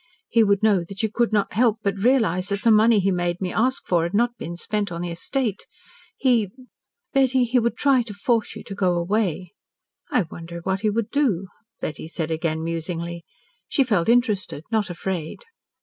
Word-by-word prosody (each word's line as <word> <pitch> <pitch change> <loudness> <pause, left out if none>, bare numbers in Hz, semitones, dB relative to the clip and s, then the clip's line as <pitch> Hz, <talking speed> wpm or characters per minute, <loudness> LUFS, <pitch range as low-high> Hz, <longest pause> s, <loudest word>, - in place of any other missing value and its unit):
He 230 -1 +4
would 200 -1 +2
know 205 -5 +4
that 195 +5 -6
you 220 - 0
could 235 +1 +1
not 205 -2 +1
help 225 +1 +3
but 200 -1 0
realise 215 -8 +2
that 200 0 -2
the 230 - +5
money 220 0 +5
he 195 0 +2
made 175 -1 -1
me 185 -2 -3
ask 255 +4 +1
for 175 -2 +2
had 170 +4 -2
not 240 +2 +2
been 170 -6 -7
spent 205 +1 -2
on 170 0 -4
the 175 -1 -3
estate. 220 +4 -2 0.5
He, 235 -7 +2 0.6
Betty, 265 -2 +3
he 245 +1 +2
would 235 0 -1
try 275 -3 +4
to 230 -3 -7
force 225 +2 0
you - - -8
to - - -8
go 185 -3 +1
away." 180 -1 -1 0.6
"I 235 - +2
wonder 170 +1 -9
what 190 +2 -1
he 215 - +2
would 215 +1 -2
do?" 210 - +1 0.3
Betty 155 - -5
said 165 -1 -4
again 160 0 -1
musingly. 165 +1 -4 0.4
She 275 - +2
felt 210 -7 +1
interested, 215 - +1
not 215 -4 +1
afraid. 175 - -4
200 Hz, 195 wpm, -23 LUFS, 175-230 Hz, 0.6 s, the